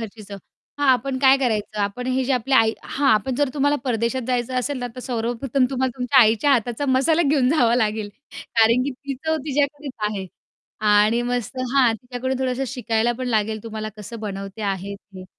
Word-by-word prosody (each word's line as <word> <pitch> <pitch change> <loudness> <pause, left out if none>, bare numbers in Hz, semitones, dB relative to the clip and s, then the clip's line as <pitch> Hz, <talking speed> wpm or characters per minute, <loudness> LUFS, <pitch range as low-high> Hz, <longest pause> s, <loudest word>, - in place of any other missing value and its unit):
घरची 220 -1 -8
चव, 200 0 -9 0.4
हां 285 -2 +1
आपण 260 +1 -1
काय 265 0 +6
करायचं, 215 -4 -1
आपण 200 +5 -2
हे 255 0 0
जे 270 - 0
आपली 255 +2 0
आई 225 -2 +5
हां, 275 -6 +2
पण 260 - -1
जर 285 +1 +1
तुम्हाला 285 0 +2
परदेशात 235 +1 -1
जायचं 250 0 -1
असेल 275 +1 -2
ना, 245 - -3
तर - - -5
सर्वप्रथम 245 +2 -1
तुम्हाला 260 -1 0
तुमच्या 255 +2 +4
आईच्या 225 +5 +4
हाताचा 240 +2 0
मसाला 275 +6 +3
घेऊन 270 -4 +3
जावा 245 -7 +3
लागेल 215 -3 0 0.5
कारण 230 +2 +5
की 280 - -2
ती 275 +1 -6
चव 315 0 +1
तिच्याकडेच 285 -1 -1 0.2
आहे 195 -3 -5 0.6
आणि 210 +3 +4
मस्त 245 -1 -3 0.2
हां, 255 -4 +5
तिच्याकडून 250 +2 -4
थोडंसं 260 0 -1
शिकायला 240 -2 0
पण 255 -1 -3
लागेल 220 -2 0
तुम्हाला 215 -1 -5
कसं 215 +2 -9
बनवते 195 0 -6
आहे 200 0 -3
ती. 195 -2 -13
245 Hz, 185 wpm, -22 LUFS, 220-265 Hz, 0.6 s, काय